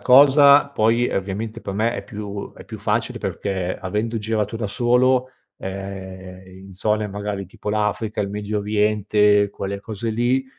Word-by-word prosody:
cosa 140 +2 +7
poi, 115 -2 +2
ovviamente, 100 +3 -3
per 100 - -4
me, 110 +4 0
è - - -5
più 105 -1 -6
è - - -14
più - - -8
facile - - -1
perché 95 -2 -2
avendo 105 +5 -2
girato 110 0 -1
da 110 - -2
solo, 125 +3 +2 0.3
ehm, 95 -1 -7 0.2
in - - -12
zone 105 +3 0
magari 100 -1 -4
tipo 100 +3 -6
l'Africa, 105 +1 -1
il 100 - -1
Medio 105 +1 -3
Oriente, 105 0 +3
quelle 100 0 -5
cose 110 +2 -4
lì, 120 +4 +1
105 Hz, 155 wpm, -22 LUFS, 100-115 Hz, 0.3 s, cosa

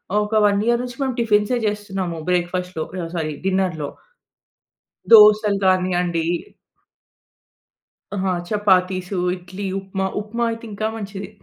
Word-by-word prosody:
ఆహ్, - - +4
ఒక 210 - -7
1 200 0 +1
ఇయర్ 235 0 +2
నుంచి 250 +2 -8
మేము 260 -2 -2
టిఫిన్సే 215 +1 +2
చేస్తున్నాము. 195 -5 -3
బ్రేక్ఫాస్ట్‌లో 180 -1 -1 0.2
ఆహ్, 165 - -8
సారీ 155 -2 -2
డిన్నర్‌లో. 185 -6 0 1.2
దోసలు 210 -2 +7
గానియండి. 180 -3 +1 1.9
ఆ! - - -3 0.3
చపాతీసు, 185 -2 +1 0.2
ఇడ్లీ, 185 +2 -7
ఉప్మా. 190 0 -3
ఉప్మా 225 +3 -3
అయితే 230 0 -6
ఇంకా 215 +2 -2
మంచిది. 200 -2 -6
195 Hz, 115 wpm, -21 LUFS, 180-210 Hz, 1.9 s, దోసలు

